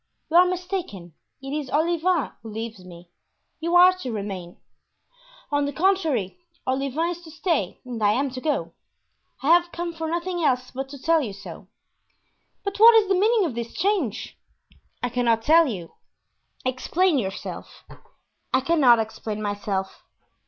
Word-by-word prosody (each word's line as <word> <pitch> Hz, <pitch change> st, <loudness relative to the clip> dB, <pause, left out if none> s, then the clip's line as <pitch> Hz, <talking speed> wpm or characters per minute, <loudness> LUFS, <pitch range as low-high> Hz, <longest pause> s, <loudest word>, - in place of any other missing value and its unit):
You 335 Hz, -, +5 dB
are 360 Hz, +1 st, +7 dB
mistaken; 360 Hz, -, -4 dB, 0.3 s
it 270 Hz, -, -6 dB
is 295 Hz, -3 st, -4 dB
Olivain 335 Hz, +2 st, +1 dB
who 225 Hz, -, -9 dB
leaves 220 Hz, -2 st, -6 dB
me; 175 Hz, -1 st, -13 dB, 0.5 s
you 335 Hz, +2 st, -1 dB
are 360 Hz, +1 st, +8 dB
to 255 Hz, -9 st, -4 dB
remain." 195 Hz, -5 st, -6 dB, 0.9 s
"On 290 Hz, 0 st, +1 dB
the -, -, -2 dB
contrary, 320 Hz, -, 0 dB, 0.3 s
Olivain 275 Hz, +6 st, -1 dB
is 345 Hz, 0 st, -7 dB
to 335 Hz, -, -13 dB
stay 320 Hz, -, -1 dB
and 240 Hz, -3 st, -6 dB
I 205 Hz, 0 st, +4 dB
am 270 Hz, +3 st, 0 dB
to 255 Hz, 0 st, -7 dB
go. 300 Hz, +1 st, -1 dB, 0.7 s
I 280 Hz, -, +1 dB
have 345 Hz, +1 st, +5 dB
come 345 Hz, 0 st, -4 dB
for 325 Hz, 0 st, -4 dB
nothing 345 Hz, +1 st, -2 dB
else 255 Hz, -3 st, +1 dB
but 270 Hz, +1 st, -5 dB
to 280 Hz, 0 st, -9 dB
tell 325 Hz, +3 st, +3 dB
you 220 Hz, -8 st, -4 dB
so." 195 Hz, -, -10 dB, 1.0 s
"But 400 Hz, 0 st, -3 dB
what 460 Hz, +1 st, +9 dB
is 425 Hz, -3 st, +4 dB
the -, -, +4 dB
meaning 420 Hz, +2 st, +3 dB
of 305 Hz, -, -3 dB
this 235 Hz, 0 st, -6 dB
change?" 355 Hz, -, -1 dB, 0.6 s
"I 245 Hz, -, 0 dB
cannot 235 Hz, -2 st, +1 dB
tell 325 Hz, +3 st, +5 dB
you." 180 Hz, -9 st, -5 dB, 0.7 s
"Explain 300 Hz, +6 st, +1 dB
yourself." 195 Hz, -3 st, -6 dB, 0.7 s
"I 260 Hz, -, +3 dB
cannot 270 Hz, -5 st, +5 dB
explain 220 Hz, -1 st, -4 dB
myself." 205 Hz, -2 st, -3 dB
280 Hz, 160 wpm, -24 LUFS, 225-345 Hz, 1.0 s, what